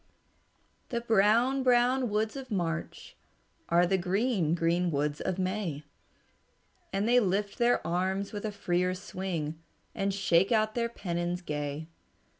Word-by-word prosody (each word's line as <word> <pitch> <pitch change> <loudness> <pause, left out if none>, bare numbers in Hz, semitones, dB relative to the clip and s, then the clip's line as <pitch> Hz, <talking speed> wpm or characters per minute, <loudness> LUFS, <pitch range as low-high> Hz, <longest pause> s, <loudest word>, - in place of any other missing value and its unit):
"The 235 -1 -2
brown, 230 +4 +3
brown 250 0 +3
woods 215 +3 -1
of 270 -1 -7
March 170 -5 -3 0.5
Are 175 +1 +4
the 190 +1 +1
green, 190 -2 +1
green 170 +1 +1
woods 145 -1 -1
of 185 -1 -2
May, 185 -5 -2 1.1
And 195 +3 0
they 245 +1 +5
lift 200 -1 -1
their 240 0 +2
arms 190 +4 -1
with 205 - -5
a 215 - -2
freer 180 -2 0
swing 180 -5 -4 0.3
And 195 0 -1
shake 190 -1 +2
out 215 -1 +2
their 235 0 -1
pennons 175 -4 -3
gay. 150 0 -4
190 Hz, 135 wpm, -29 LUFS, 175-220 Hz, 1.1 s, they